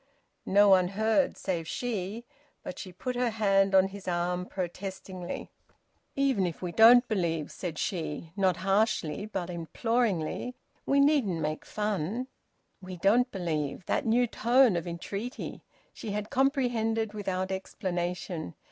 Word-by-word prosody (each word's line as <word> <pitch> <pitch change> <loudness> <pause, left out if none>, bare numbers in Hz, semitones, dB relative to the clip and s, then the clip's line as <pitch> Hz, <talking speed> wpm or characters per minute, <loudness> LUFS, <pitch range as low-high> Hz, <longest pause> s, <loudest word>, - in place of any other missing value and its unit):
No 205 +2 +6
one 185 -2 +6
heard 220 +8 +1
save 170 -4 -3
she. 225 0 -3 0.4
But - - -7
she 185 - -7
put 250 +8 -4
her 245 0 +1
hand 195 -3 +3
on 190 0 +5
his 195 -1 -10
arm 180 +1 -1
protestingly. 185 0 -5 0.6
"Even 265 -9 +2
if 170 - -6
we 180 -2 -4
don't 240 +5 +7
believe," 170 -7 -1
said 170 -4 -5
she 165 -4 -3
not 190 -3 +2
harshly, 200 -3 +1
but 185 -4 -4
imploringly, 205 - -1 0.3
"we 280 - +3
needn't 280 - +3
make 155 0 -3
fun." 210 +2 -2 0.6
"We 185 -1 -8
don't 225 +8 +3
believe!" 160 - -2
And - - -29
that 280 - 0
new 240 +2 +4
tone 240 -1 +4
of 170 0 -2
entreaty! 200 - -5 0.3
She 220 - -7
had 210 0 -4
comprehended 240 -5 +1
without 190 -2 -2
explanation. 180 - -3
195 Hz, 140 wpm, -29 LUFS, 180-225 Hz, 0.6 s, don't